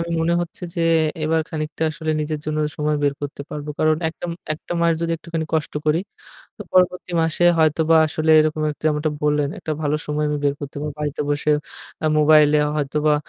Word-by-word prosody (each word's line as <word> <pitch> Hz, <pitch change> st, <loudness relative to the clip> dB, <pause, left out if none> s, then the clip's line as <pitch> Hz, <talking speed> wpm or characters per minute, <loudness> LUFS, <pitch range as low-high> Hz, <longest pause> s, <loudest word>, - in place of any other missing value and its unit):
আমি 170 Hz, 0 st, -3 dB
মনে 170 Hz, +1 st, +2 dB
হচ্ছে 175 Hz, +1 st, -9 dB
যে 170 Hz, -, -2 dB, 0.4 s
এবার 160 Hz, +1 st, +2 dB
খানিকটা 155 Hz, 0 st, -4 dB
আসলে 160 Hz, 0 st, -4 dB
নিজের 150 Hz, 0 st, -3 dB
জন্য 155 Hz, 0 st, -2 dB, 0.2 s
সময় 150 Hz, 0 st, 0 dB
বের 140 Hz, -1 st, +2 dB
করতে 140 Hz, 0 st, -5 dB
পারবো। 150 Hz, 0 st, -5 dB
কারণ 155 Hz, 0 st, +3 dB
একটা 160 Hz, -, -9 dB, 0.3 s
একটা 160 Hz, -, -8 dB
মাস 170 Hz, 0 st, +4 dB
যদি 170 Hz, 0 st, -1 dB
একটুখানি 160 Hz, 0 st, -4 dB
কষ্ট 155 Hz, -1 st, -1 dB
করি 155 Hz, +3 st, +3 dB, 0.6 s
তো -, -, -7 dB
পরবর্তী 180 Hz, -1 st, +2 dB
মাসে 165 Hz, +2 st, 0 dB
হয়তোবা 160 Hz, +1 st, +3 dB
আসলে 155 Hz, +1 st, 0 dB
এরকম 155 Hz, 0 st, 0 dB
একটা 150 Hz, -, -10 dB
যেমনটা 150 Hz, 0 st, +1 dB
বললেন 150 Hz, -1 st, +2 dB
একটা 155 Hz, -, -4 dB
ভালো 150 Hz, +1 st, +1 dB
সময় 150 Hz, 0 st, -1 dB
আমি 150 Hz, -, -1 dB
বের 140 Hz, 0 st, +2 dB
করতে 145 Hz, 0 st, -7 dB
পারবো। 150 Hz, -1 st, -3 dB
বাড়িতে 150 Hz, 0 st, -2 dB
বসে 145 Hz, +1 st, 0 dB, 0.5 s
আ -, -, +3 dB
মোবাইলে 150 Hz, 0 st, +6 dB, 0.2 s
হয়তোবা 150 Hz, +1 st, +1 dB
155 Hz, 190 wpm, -21 LUFS, 150-160 Hz, 0.6 s, মোবাইলে